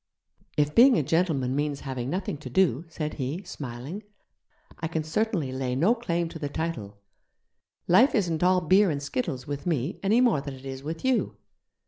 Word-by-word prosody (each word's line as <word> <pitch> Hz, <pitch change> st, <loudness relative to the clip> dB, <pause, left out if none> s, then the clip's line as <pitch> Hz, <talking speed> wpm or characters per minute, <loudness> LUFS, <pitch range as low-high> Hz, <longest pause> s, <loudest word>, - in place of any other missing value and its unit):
'If 150 Hz, 0 st, +2 dB
being 250 Hz, +1 st, +7 dB
a -, -, +2 dB
gentleman 140 Hz, -5 st, +1 dB
means 145 Hz, -1 st, -1 dB
having 130 Hz, -2 st, -4 dB
nothing 185 Hz, +1 st, -2 dB
to 150 Hz, -, -8 dB
do,' 170 Hz, -6 st, +2 dB
said 155 Hz, -2 st, -4 dB
he, 145 Hz, +7 st, -4 dB
smiling, 140 Hz, -, -7 dB, 0.8 s
'I 160 Hz, -, -2 dB
can 160 Hz, -1 st, -2 dB
certainly 165 Hz, -, -1 dB
lay 130 Hz, -1 st, -2 dB
no 175 Hz, -, +4 dB
claim 175 Hz, -8 st, -1 dB
to 165 Hz, -, -8 dB
the 145 Hz, -2 st, -3 dB
title. 140 Hz, -11 st, -4 dB, 0.9 s
Life 235 Hz, -, +5 dB
isn't 170 Hz, -7 st, 0 dB
all 180 Hz, 0 st, +4 dB
beer 190 Hz, +4 st, +4 dB
and 145 Hz, -2 st, -2 dB
skittles 145 Hz, -, -3 dB
with 145 Hz, +2 st, -5 dB
me, 155 Hz, -1 st, -1 dB
any 210 Hz, +4 st, +3 dB
more 240 Hz, -, +3 dB
than 140 Hz, -1 st, -6 dB
it 130 Hz, +1 st, -14 dB
is 135 Hz, 0 st, -6 dB
with 160 Hz, -, -5 dB
you. 260 Hz, -2 st, +1 dB
160 Hz, 180 wpm, -27 LUFS, 135-185 Hz, 0.9 s, being